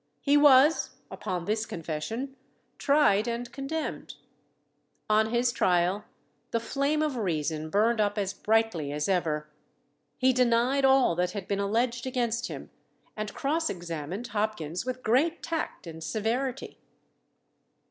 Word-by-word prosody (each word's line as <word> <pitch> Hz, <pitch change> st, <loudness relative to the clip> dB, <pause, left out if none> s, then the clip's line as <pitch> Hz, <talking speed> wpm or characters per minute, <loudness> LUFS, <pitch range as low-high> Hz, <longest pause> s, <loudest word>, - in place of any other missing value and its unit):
He 285 Hz, 0 st, +4 dB
was, 290 Hz, +1 st, +5 dB, 0.2 s
upon 180 Hz, -2 st, -4 dB
this 215 Hz, +2 st, -1 dB
confession, 200 Hz, -, -4 dB, 0.4 s
tried 280 Hz, -7 st, +3 dB
and 235 Hz, +1 st, -3 dB
condemned. 295 Hz, +3 st, -4 dB, 1.0 s
On 220 Hz, +1 st, +4 dB
his 240 Hz, +1 st, +2 dB
trial, 180 Hz, 0 st, +1 dB, 0.4 s
the 230 Hz, -, 0 dB
flame 280 Hz, +6 st, 0 dB
of 295 Hz, -4 st, -1 dB
reason 155 Hz, -6 st, -2 dB
burned 215 Hz, +5 st, +2 dB
up 205 Hz, 0 st, 0 dB
as 195 Hz, -2 st, -1 dB
brightly 220 Hz, -9 st, +1 dB
as 150 Hz, +1 st, -2 dB
ever. 160 Hz, -5 st, 0 dB, 0.7 s
He 260 Hz, 0 st, +3 dB
denied 250 Hz, +2 st, +3 dB
all 265 Hz, -8 st, +5 dB
that 180 Hz, 0 st, 0 dB
had 200 Hz, -3 st, -5 dB
been 200 Hz, -1 st, -1 dB
alleged 235 Hz, +5 st, 0 dB
against 240 Hz, -2 st, -1 dB
him, -, -, -8 dB, 0.4 s
and 215 Hz, -1 st, -4 dB
cross 320 Hz, +4 st, 0 dB
examined 175 Hz, +3 st, -5 dB
Hopkins 210 Hz, -3 st, -2 dB
with 255 Hz, 0 st, -4 dB
great 295 Hz, +9 st, +2 dB
tact 325 Hz, -, -3 dB
and 165 Hz, -1 st, -8 dB
severity. 235 Hz, -, -2 dB
225 Hz, 130 wpm, -28 LUFS, 180-260 Hz, 1.0 s, was